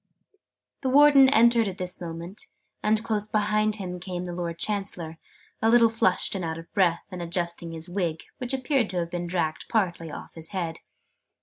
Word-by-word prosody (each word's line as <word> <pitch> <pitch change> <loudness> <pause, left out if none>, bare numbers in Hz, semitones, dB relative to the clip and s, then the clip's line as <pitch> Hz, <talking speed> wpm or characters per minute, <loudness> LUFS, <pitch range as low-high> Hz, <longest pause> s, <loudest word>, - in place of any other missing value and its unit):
The 265 - 0
Warden 280 0 +7
entered 235 -3 +5
at 190 -1 -5
this 180 0 -3
moment: 170 +3 -7 0.3
and 215 +1 +2
close 215 -2 -1
behind 215 0 +1
him 180 -3 -5
came 180 -1 -5
the 175 -1 -5
Lord 170 -1 -4
Chancellor, 180 -5 -2 0.4
a 225 - +3
little 230 -1 +6
flushed 220 -5 +1
and 190 -3 -2
out 160 -1 -3
of 165 0 -12
breath, 175 -3 +2
and 180 -1 -6
adjusting 170 0 -3
his 165 +1 -7
wig, 175 -3 -2 0.2
which 250 -2 -2
appeared 265 -3 +1
to 185 - -3
have 170 -1 -2
been 175 0 -3
dragged 170 -3 -1
partly 175 -7 0
off - - -9
his 165 -1 -7
head. 170 -4 -4
185 Hz, 185 wpm, -26 LUFS, 170-215 Hz, 0.4 s, Warden